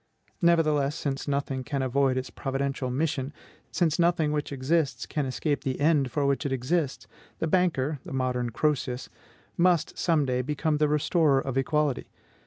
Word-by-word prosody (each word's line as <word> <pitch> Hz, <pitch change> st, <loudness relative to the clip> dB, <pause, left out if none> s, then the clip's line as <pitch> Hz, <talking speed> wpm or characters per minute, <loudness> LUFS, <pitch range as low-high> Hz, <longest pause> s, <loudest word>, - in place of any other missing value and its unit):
Nevertheless, 155 Hz, -4 st, +3 dB
since 140 Hz, -2 st, -3 dB
nothing 140 Hz, -2 st, -1 dB
can 140 Hz, -1 st, -2 dB
avoid 130 Hz, 0 st, +2 dB
its 130 Hz, +1 st, -3 dB
providential 135 Hz, -1 st, -2 dB
mission, 140 Hz, 0 st, -1 dB, 0.4 s
since 165 Hz, -2 st, +1 dB
nothing 170 Hz, -3 st, +2 dB
which 150 Hz, -1 st, -2 dB
exists 135 Hz, -2 st, 0 dB
can 145 Hz, -3 st, -2 dB
escape 145 Hz, +3 st, -1 dB
the 130 Hz, -1 st, -2 dB
end 145 Hz, -3 st, +3 dB
for 145 Hz, +2 st, -1 dB
which 140 Hz, +2 st, +1 dB
it 140 Hz, -, -2 dB
exists 135 Hz, +3 st, -1 dB, 0.3 s
the -, -, -1 dB
banker 155 Hz, -5 st, +1 dB
(the -, -, -9 dB
modern 125 Hz, -2 st, -1 dB
Croesus) 130 Hz, 0 st, -1 dB, 0.5 s
must 175 Hz, -3 st, +2 dB
some 160 Hz, -5 st, +2 dB
day 125 Hz, -1 st, 0 dB
become 150 Hz, +3 st, -1 dB
the 150 Hz, 0 st, +3 dB
restorer 150 Hz, -1 st, +3 dB
of 135 Hz, -1 st, -4 dB
equality. 145 Hz, 0 st, 0 dB
140 Hz, 160 wpm, -27 LUFS, 130-155 Hz, 0.5 s, Nevertheless